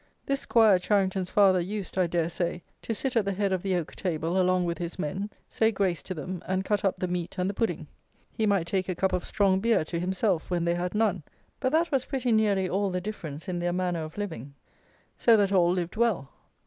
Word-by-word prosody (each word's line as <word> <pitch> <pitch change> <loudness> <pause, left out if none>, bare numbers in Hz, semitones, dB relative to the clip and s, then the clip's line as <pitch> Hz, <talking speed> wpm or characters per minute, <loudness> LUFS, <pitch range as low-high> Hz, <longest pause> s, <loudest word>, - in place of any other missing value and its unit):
This 275 0 0
'Squire 220 -8 +4
Charington's 190 -1 +1
father 195 -3 +5
used, 195 +2 -4
I 185 -2 +2
dare 170 -1 0
say, 175 0 -3 0.2
to 225 - -3
sit 260 +3 -3
at 225 - +4
the 200 - -1
head 200 0 0
of 185 - -1
the 190 -1 0
oak 175 -3 -3
table 170 +1 -1
along 185 0 +2
with 170 0 -2
his 175 -1 -4
men, 190 +5 -3 0.2
say 220 0 +2
grace 190 -5 0
to 185 - -6
them, 180 +3 -5
and 190 +1 -1
cut 210 +1 0
up 195 - +2
the 185 - -2
meat 175 -1 -3
and 180 0 0
the 200 - -1
pudding. 225 +3 -1 0.5
He 220 -2 0
might 200 -5 +2
take 185 +1 -1
a 185 - -1
cup 190 +1 0
of 180 - 0
strong 195 -2 +2
beer 225 -5 +2
to 170 +1 -3
himself, 185 0 0
when 175 -2 0
they 170 - +2
had 175 +2 -3
none; 210 -5 +1 0.4
but 260 - 0
that 335 +2 +2
was 270 -3 +1
pretty 255 -3 -1
nearly 205 -4 +3
all 195 +2 0
the 180 0 -1
difference 170 -5 -7
in 180 -2 -2
their 175 0 -1
manner 180 -2 -1
of 155 +3 -9
living. 145 - -5 0.6
So 230 -2 +5
that 200 -2 +2
all 180 -3 +4
lived 180 0 -2
well. 215 - +1
185 Hz, 235 wpm, -27 LUFS, 175-205 Hz, 0.6 s, father